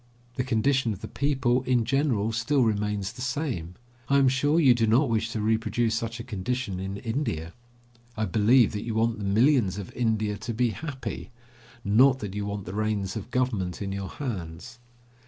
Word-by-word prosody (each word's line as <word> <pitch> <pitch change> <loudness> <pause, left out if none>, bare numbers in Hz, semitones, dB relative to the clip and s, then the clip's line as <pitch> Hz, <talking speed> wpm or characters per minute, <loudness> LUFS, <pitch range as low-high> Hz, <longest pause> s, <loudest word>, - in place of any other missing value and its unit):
The 125 - -1
condition 125 0 +1
of 100 - -10
the - - -5
people, 130 -3 +1
in 125 -3 +1
general, 120 -5 +1
still 115 +5 +1
remains 105 -2 -1
the 125 - -11
same. 125 - -3 0.3
I 140 - +4
am 135 -2 +5
sure 145 +5 +2
you 135 -6 +6
do 115 -2 +1
not 120 +4 +3
wish 110 0 0
to 115 -1 -3
reproduce 110 +1 +1
such 115 0 -3
a - - -5
condition 110 -1 -3
in 95 +1 -4
India. 100 - -3 0.6
I 110 - 0
believe 115 +3 +4
that 105 - -4
you 115 -2 -4
want 115 0 +1
the - - -5
millions 110 0 +3
of 100 -3 -7
India 110 -3 0
to 115 -1 -5
be 120 0 +2
happy, 145 0 -6 0.5
not 130 +7 +5
that 105 -6 -6
you 105 0 -3
want 100 -1 -4
the 90 - -6
reins 105 -2 -1
of 110 +1 -6
Government 115 -9 -1
in 100 -1 -4
your 100 -1 -4
hands. 105 - -6
115 Hz, 190 wpm, -26 LUFS, 105-130 Hz, 0.6 s, you